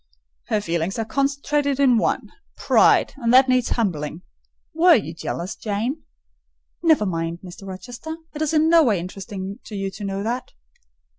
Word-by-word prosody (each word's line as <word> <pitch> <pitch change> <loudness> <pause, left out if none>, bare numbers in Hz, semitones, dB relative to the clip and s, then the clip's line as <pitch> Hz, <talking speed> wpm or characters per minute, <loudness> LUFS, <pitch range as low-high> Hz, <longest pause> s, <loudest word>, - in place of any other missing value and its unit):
"Her 215 - 0
feelings 170 +2 -2
are 225 - -1
concentrated 280 +2 0
in 255 -5 +5
one—pride; 410 - +1
and 235 -4 0
that 260 +1 +7
needs 255 -2 +2
humbling. 170 -7 -2 0.5
Were 335 +1 +6
you 170 -8 -2
jealous, 170 +3 -5
Jane?" 230 +8 -3 0.8
"Never 315 -10 +4
mind, 165 -2 -3
Mr. 185 +2 -10
Rochester: 245 - -7 0.2
it 300 - -6
is 310 - +1
in 315 0 +3
no 335 0 +6
way 215 - +2
interesting 195 +2 -7
to 215 - -8
you 195 -1 -3
to 205 - -9
know 195 0 -3
that. 240 +3 -3
225 Hz, 155 wpm, -22 LUFS, 190-280 Hz, 0.8 s, that